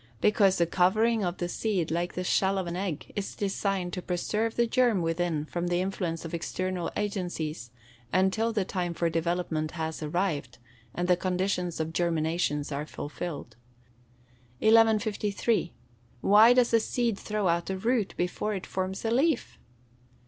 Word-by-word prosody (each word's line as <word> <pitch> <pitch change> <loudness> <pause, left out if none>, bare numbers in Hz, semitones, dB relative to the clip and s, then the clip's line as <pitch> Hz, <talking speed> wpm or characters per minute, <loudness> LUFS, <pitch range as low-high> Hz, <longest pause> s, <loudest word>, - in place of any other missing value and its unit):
_ - - -30 0.2
Because 200 - +4
the 170 - +3
covering 215 +6 +2
of 175 0 -2
the 175 - -2
seed, 180 -4 -1
like 175 +2 -1
the 180 - -2
shell 190 +1 +2
of 190 - -1
an 170 0 -4
egg, 180 -5 -4
is 200 -1 -4
designed 195 -2 -1
to 180 - -3
preserve 210 +6 -1
the 235 - +3
germ 235 -6 +2
within 165 -2 -1
from 175 +2 -3
the 175 0 +1
influence 180 -3 -2
of 165 - -7
external 180 +1 -2
agencies, 175 - -3 0.4
until 190 +5 +2
the 210 -4 0
time 175 -3 -2
for 170 0 0
development 165 -1 -1
has 160 0 -3
arrived, 155 -4 -2 0.4
and 175 0 -1
the 180 - +5
conditions 180 -1 -1
of 160 0 -2
germination 165 -3 0
are 145 +2 -3
fulfilled. 145 -6 -6 1.0
1153. 220 -2 +3 0.5
_Why 220 +4 +7
does 245 -2 +3
a 230 - +6
seed 235 0 0
throw 210 -2 -1
out 170 +1 0
a 190 - -1
root, 225 0 0
before 205 +4 -1
it 190 - -5
forms 190 +2 -3
a 225 - +1
leaf? 295 +7 +1
185 Hz, 160 wpm, -28 LUFS, 170-210 Hz, 1.0 s, Why